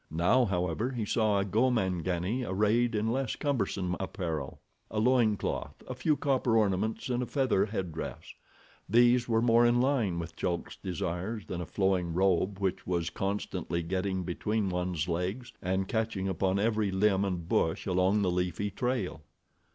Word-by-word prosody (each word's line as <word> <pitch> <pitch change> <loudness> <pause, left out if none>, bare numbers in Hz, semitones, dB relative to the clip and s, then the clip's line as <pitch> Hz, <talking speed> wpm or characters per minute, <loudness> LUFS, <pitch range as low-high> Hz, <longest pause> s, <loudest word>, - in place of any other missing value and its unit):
Now, 90 +11 +3
however, 90 +3 -1
he 120 -5 -3
saw 105 -1 +2
a 100 - 0
Gomangani 95 -2 0
arrayed 110 +3 +1
in 110 +2 0
less 130 -1 -1
cumbersome 105 - -1
apparel—a 95 +3 -5
loin 115 -2 +3
cloth, - - -4
a - - -4
few 145 +4 +1
copper 130 -4 +2
ornaments 105 +1 0
and 125 -1 0
a 125 - -2
feather 130 -8 +1
headdress. 90 -6 -5 0.6
These 120 +2 +4
were 115 0 +2
more 120 0 +5
in 120 0 +4
line 120 -9 +1
with 85 0 -5
Chulk's 85 -2 -3
desires 95 +3 -3
than 90 -1 -4
a 85 - -5
flowing 95 -4 0
robe 95 +1 +2
which 95 -2 -2
was 85 -2 -1
constantly 95 -3 -2
getting 95 +2 -1
between 100 +4 -1
one's 90 -3 -2
legs, 95 +8 -3
and 95 +1 -1
catching 110 -3 -1
upon 95 +1 0
every 105 0 +1
limb 95 0 +2
and 90 -4 -2
bush 80 - +1
along 95 +2 +2
the 90 - +2
leafy 90 +3 -1
trail. 115 -6 -2
100 Hz, 155 wpm, -30 LUFS, 90-115 Hz, 0.6 s, more